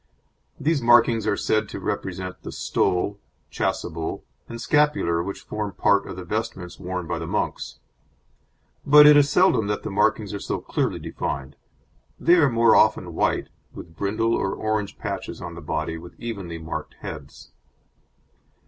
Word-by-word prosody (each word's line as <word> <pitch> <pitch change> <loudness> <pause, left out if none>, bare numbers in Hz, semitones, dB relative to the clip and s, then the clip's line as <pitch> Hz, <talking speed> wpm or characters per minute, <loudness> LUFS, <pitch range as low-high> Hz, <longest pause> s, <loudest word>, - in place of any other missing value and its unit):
These 155 -2 +1
markings 115 -2 +4
are 105 - +1
said 110 -1 0
to - - -6
represent 90 0 -4
the - - -7
stole, 100 +3 0 0.3
chasuble 80 -1 -3 0.3
and 115 - -7
scapular 145 - +2
which 100 +3 -5
form 105 -2 -4
part 100 +2 +2
of - - -6
the 95 - -7
vestments 90 -2 -4
worn 90 -1 -4
by 85 0 -3
the - - -5
monks; - - -3 1.1
but 150 +1 +8
it 150 0 +9
is 145 -1 +5
seldom 180 - +3
that 105 0 -2
the 110 - -4
markings 105 0 +1
are 100 - -4
so - - -3
clearly - - -2
defined; 70 -2 -5 0.6
they 170 - +4
are 145 -5 +5
more 115 -1 +4
often 95 -5 +3
white, - - 0 0.3
with 80 -1 -10
brindle 110 +5 0
or 95 - 0
orange 110 -2 -2
patches - - -5
on 85 -1 -7
the 85 - -9
body, 80 +1 -3
with 85 - -13
evenly 100 -8 -5
marked 80 -1 -6
heads. 75 -5 -9
100 Hz, 155 wpm, -24 LUFS, 85-115 Hz, 1.1 s, it